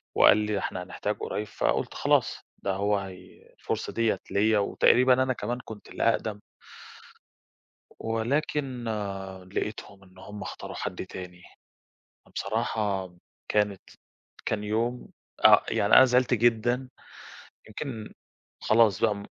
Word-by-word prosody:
وقال -, -, +7 dB
لي: 105 Hz, 0 st, -1 dB
"ده 100 Hz, -, 0 dB
إحنا 90 Hz, -1 st, -4 dB
هنحتاج 100 Hz, +2 st, -4 dB
قريب." 105 Hz, 0 st, -3 dB
فقُلت -, -, -1 dB
خلاص، -, -, +2 dB, 0.3 s
ده 100 Hz, -, 0 dB
هو 100 Hz, +1 st, +1 dB
هي 95 Hz, -2 st, -10 dB
الفرصة -, -, -3 dB
ديّة 115 Hz, -1 st, +1 dB
ليا، 105 Hz, +1 st, +3 dB
وتقريبًا 125 Hz, +5 st, +4 dB
أنا 130 Hz, 0 st, 0 dB
كمان 120 Hz, +2 st, -3 dB
كنت 110 Hz, -2 st, -10 dB
الأقدم. 110 Hz, -2 st, 0 dB, 1.6 s
ولكن 125 Hz, +2 st, -1 dB, 0.7 s
لقيتهم 100 Hz, -2 st, -4 dB
إن 95 Hz, 0 st, -19 dB
هُم 105 Hz, +2 st, -9 dB
اختاروا -, -, -7 dB
حد 95 Hz, 0 st, -4 dB
تاني، 90 Hz, -1 st, -9 dB, 0.8 s
فبصراحة 105 Hz, -5 st, -2 dB, 0.3 s
كانت 105 Hz, -2 st, +1 dB, 0.6 s
كان 105 Hz, -1 st, -1 dB
يوم 115 Hz, +4 st, -1 dB, 0.4 s
آآ -, -, +8 dB
يعني، -, -, +3 dB
أنا 130 Hz, -, +10 dB
زعلت 125 Hz, 0 st, +3 dB
جدًا، 120 Hz, +3 st, +2 dB, 0.8 s
يمكن 110 Hz, -1 st, -6 dB, 0.5 s
خلاص 110 Hz, -4 st, +4 dB
بقى 105 Hz, -2 st, +1 dB
105 Hz, 120 wpm, -27 LUFS, 100-120 Hz, 1.6 s, أنا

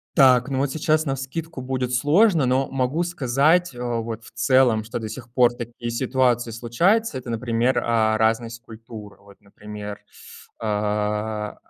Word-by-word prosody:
Так, 130 Hz, -3 st, +5 dB
ну 135 Hz, -, -2 dB
вот 140 Hz, +1 st, 0 dB
сейчас 155 Hz, +1 st, +1 dB
навскидку 135 Hz, +3 st, -4 dB
будет 125 Hz, -1 st, -3 dB
сложно, 160 Hz, -, +3 dB
но 130 Hz, +2 st, +1 dB
могу 135 Hz, +5 st, 0 dB
сказать 160 Hz, +1 st, +1 dB
вот 115 Hz, -2 st, -4 dB
в -, -, -14 dB
целом, 130 Hz, -4 st, +3 dB
что 115 Hz, +2 st, -5 dB
до 110 Hz, -, -5 dB
сих 120 Hz, +2 st, -9 dB
пор 120 Hz, -2 st, +4 dB
такие 120 Hz, 0 st, -7 dB
ситуации 120 Hz, -1 st, 0 dB
случаются. 155 Hz, -, +1 dB
Это, 125 Hz, -1 st, -8 dB
например, 120 Hz, +2 st, 0 dB
а, 110 Hz, -2 st, +2 dB
разность 115 Hz, +1 st, 0 dB
культур 110 Hz, -2 st, -11 dB
вот, 100 Hz, 0 st, -18 dB
например. 105 Hz, 0 st, -9 dB, 0.6 s
А, 105 Hz, 0 st, -2 dB
120 Hz, 145 wpm, -23 LUFS, 110-135 Hz, 0.6 s, Так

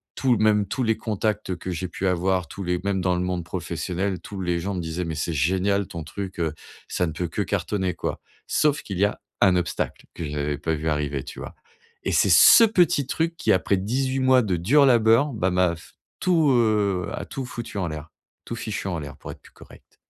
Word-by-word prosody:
tout 125 Hz, -3 st, +2 dB
même 105 Hz, -1 st, +3 dB
tous 125 Hz, +6 st, -2 dB
les 110 Hz, -1 st, +2 dB
contacts 105 Hz, -3 st, -2 dB
que 90 Hz, -, -5 dB
j'ai 90 Hz, +1 st, -4 dB
pu 95 Hz, -, -3 dB
avoir 90 Hz, 0 st, +1 dB
tous 100 Hz, -, -7 dB
les 90 Hz, -1 st, -1 dB
même 95 Hz, -2 st, 0 dB
dans 90 Hz, 0 st, +1 dB
le 90 Hz, -, -1 dB
monde 90 Hz, -1 st, -2 dB
professionnel, 90 Hz, +2 st, -3 dB
tous 100 Hz, +1 st, -8 dB
les 90 Hz, -2 st, -1 dB
gens 100 Hz, +2 st, -3 dB
me 90 Hz, -, -3 dB
disaient: 80 Hz, +2 st, -3 dB
«Mais 80 Hz, -1 st, -4 dB
c'est 80 Hz, +2 st, -2 dB
génial 95 Hz, +6 st, +1 dB
ton 85 Hz, -2 st, -6 dB
truc, 95 Hz, -3 st, -6 dB
heu, 80 Hz, -3 st, 0 dB, 0.3 s
ça 90 Hz, -, 0 dB
ne 80 Hz, -, -3 dB
peut 85 Hz, +3 st, -3 dB
que -, -, -3 dB
cartonner 95 Hz, -4 st, -1 dB
quoi». -, -, -4 dB, 0.3 s
Sauf 150 Hz, -1 st, +2 dB
qu'il 95 Hz, -, -6 dB
y -, -, +4 dB
a 105 Hz, -, -3 dB, 0.2 s
un 90 Hz, -2 st, +5 dB
obstacle, 85 Hz, -1 st, -3 dB
que 85 Hz, -, -6 dB
je 75 Hz, -, -4 dB
n'avais 75 Hz, -1 st, -2 dB
pas 80 Hz, +2 st, -2 dB
vu 80 Hz, +1 st, -4 dB
arriver, 75 Hz, -3 st, -1 dB
tu 75 Hz, -, -9 dB
vois? -, -, -7 dB, 0.5 s
Et -, -, -1 dB
c'est -, -, +4 dB
ce 235 Hz, -, +9 dB
petit 175 Hz, -, +3 dB
truc 165 Hz, +3 st, -1 dB
qui -, -, 0 dB
après 95 Hz, +1 st, +2 dB
18 130 Hz, +7 st, -1 dB
mois 130 Hz, -1 st, +5 dB
de 100 Hz, -6 st, 0 dB
dur 130 Hz, -, +4 dB
labeur, 120 Hz, +2 st, +4 dB
ben 95 Hz, -4 st, 0 dB
m'a 90 Hz, -1 st, +2 dB
f 85 Hz, -, -16 dB, 0.3 s
tout, 170 Hz, -4 st, +3 dB
heu, 105 Hz, -6 st, +2 dB
a -, -, -5 dB
tout 135 Hz, -, -5 dB
foutu 120 Hz, -4 st, -7 dB
en 90 Hz, -3 st, -1 dB
l'air, 75 Hz, 0 st, -7 dB, 0.4 s
tout 115 Hz, -, -5 dB
fichu 105 Hz, -3 st, -4 dB
en 85 Hz, -3 st, -2 dB
l'air, 75 Hz, 0 st, -8 dB
pour -, -, -8 dB
être -, -, -13 dB
plus -, -, -18 dB
correct. -, -, -17 dB
95 Hz, 230 wpm, -24 LUFS, 85-110 Hz, 0.5 s, ce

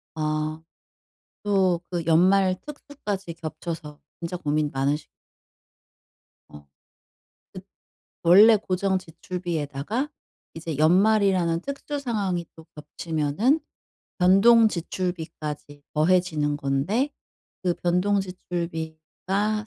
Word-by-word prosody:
아. 155 Hz, 0 st, -2 dB, 0.8 s
또 190 Hz, -4 st, +2 dB
그 175 Hz, -2 st, -2 dB
연말 185 Hz, +3 st, +4 dB
특수까지 210 Hz, -, -6 dB
겹쳐서 160 Hz, -2 st, -7 dB, 0.2 s
진짜 170 Hz, +1 st, -4 dB
고민 150 Hz, -2 st, 0 dB
많으시 145 Hz, +3 st, -1 dB, 1.4 s
어. 75 Hz, -, -12 dB, 1.6 s
그 170 Hz, -, +2 dB
원래 215 Hz, +5 st, +8 dB
고정 190 Hz, -1 st, 0 dB
지출비에다가 175 Hz, -, -4 dB, 0.4 s
이제 160 Hz, -2 st, -5 dB
연말이라는 185 Hz, 0 st, +3 dB
특수 280 Hz, +3 st, -5 dB
상황이 200 Hz, -9 st, -2 dB
또 160 Hz, -, -14 dB
겹치면은 160 Hz, -, 0 dB, 0.6 s
변동 220 Hz, +5 st, +6 dB
지출비까지 160 Hz, -5 st, -5 dB
더해지는 155 Hz, -2 st, +2 dB
건데 150 Hz, -, 0 dB, 0.5 s
그 180 Hz, -1 st, +1 dB
변동 180 Hz, +4 st, +1 dB
지출비가 180 Hz, +3 st, -3 dB
175 Hz, 210 characters per minute, -25 LUFS, 155-195 Hz, 1.6 s, 원래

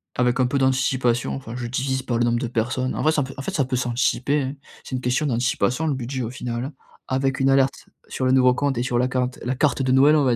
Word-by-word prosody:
Avec 125 Hz, +1 st, +2 dB
un -, -, +4 dB
peu 125 Hz, +3 st, 0 dB
d'anticipation, 130 Hz, -2 st, +1 dB
enfin 120 Hz, -3 st, -7 dB
je 120 Hz, -1 st, -4 dB
divise 130 Hz, +2 st, -1 dB
par 120 Hz, -, -1 dB
le 120 Hz, -, +2 dB
nombre 120 Hz, 0 st, +1 dB
de 125 Hz, -, -2 dB
personnes. 120 Hz, +2 st, -1 dB
En -, -, -2 dB
vrai 155 Hz, -, +3 dB
ça 150 Hz, -, +1 dB
peut 135 Hz, +1 st, -7 dB
en -, -, -4 dB
fait 195 Hz, -, -4 dB
ça 150 Hz, -, +2 dB
peut 130 Hz, 0 st, -2 dB
s'anticiper 125 Hz, +3 st, +1 dB
hein, 135 Hz, 0 st, -3 dB, 0.3 s
c'est -, -, -9 dB
une -, -, -1 dB
question 125 Hz, +5 st, 0 dB
d'anticipation, 125 Hz, +2 st, 0 dB
le 150 Hz, -, +1 dB
budget, 130 Hz, 0 st, -4 dB
au 110 Hz, -, -3 dB
final. 125 Hz, +2 st, -4 dB, 0.3 s
Avec 135 Hz, 0 st, 0 dB
une 135 Hz, 0 st, +3 dB
alerte 135 Hz, 0 st, +2 dB, 0.2 s
sur 130 Hz, -, -2 dB
le 130 Hz, -, +3 dB
nouveau 130 Hz, -1 st, +5 dB
compte 140 Hz, 0 st, -1 dB
et 120 Hz, -, 0 dB
sur 125 Hz, -1 st, 0 dB
la 125 Hz, -, +2 dB
cante 125 Hz, 0 st, -2 dB
la 125 Hz, +2 st, -1 dB
carte 140 Hz, +1 st, +1 dB
de 130 Hz, -1 st, +1 dB
Noël 140 Hz, +3 st, +6 dB
on 145 Hz, -, +2 dB
va 125 Hz, -2 st, +3 dB
130 Hz, 270 wpm, -23 LUFS, 125-135 Hz, 0.3 s, Noël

